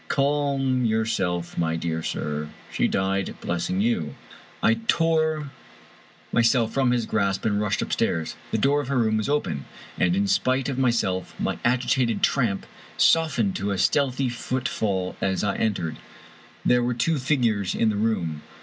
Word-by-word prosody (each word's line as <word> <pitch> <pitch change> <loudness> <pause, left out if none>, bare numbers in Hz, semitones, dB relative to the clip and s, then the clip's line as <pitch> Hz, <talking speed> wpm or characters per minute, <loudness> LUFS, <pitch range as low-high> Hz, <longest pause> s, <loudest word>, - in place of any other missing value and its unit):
Calm 140 -2 +1
your 110 -1 +1
self, 90 -7 -2
my 80 -1 +1
dear 80 0 -2
sir. 75 -1 -3 0.2
She - - +1
died 95 0 -1
blessing 90 +2 -1
you." 85 -11 0 0.5
I 115 0 +4
tore 155 -3 +1 0.8
myself 115 -1 +3
from 135 -2 +2
his 120 -2 +1
grasp 100 -2 0
and 105 -1 +1
rushed 105 -1 0
upstairs. 80 -1 -1
The - - 0
door 140 +6 +2
of 140 - -7
her 140 0 0
room 110 -2 +2
was 110 +4 -1
open, 75 - -1 0.3
and, 175 - +3
in 200 +1 +2
spite 135 -9 +1
of 135 -1 -2
myself, 115 -8 0
my - - -1
agitated 125 -1 +1
tramp 115 -8 +1 0.3
softened 140 -12 +3
to 100 +1 -2
a 100 - -1
stealthy 135 +2 +1
footfall 110 -6 -2
as 95 -1 0
I 105 - 0
entered. 95 -7 -1 0.7
There 125 0 +4
were 120 0 0
two 150 +6 +1
figures 120 -8 +1
in 115 - +2
the - - -3
room. 95 -8 -1
115 Hz, 160 wpm, -25 LUFS, 95-135 Hz, 0.8 s, I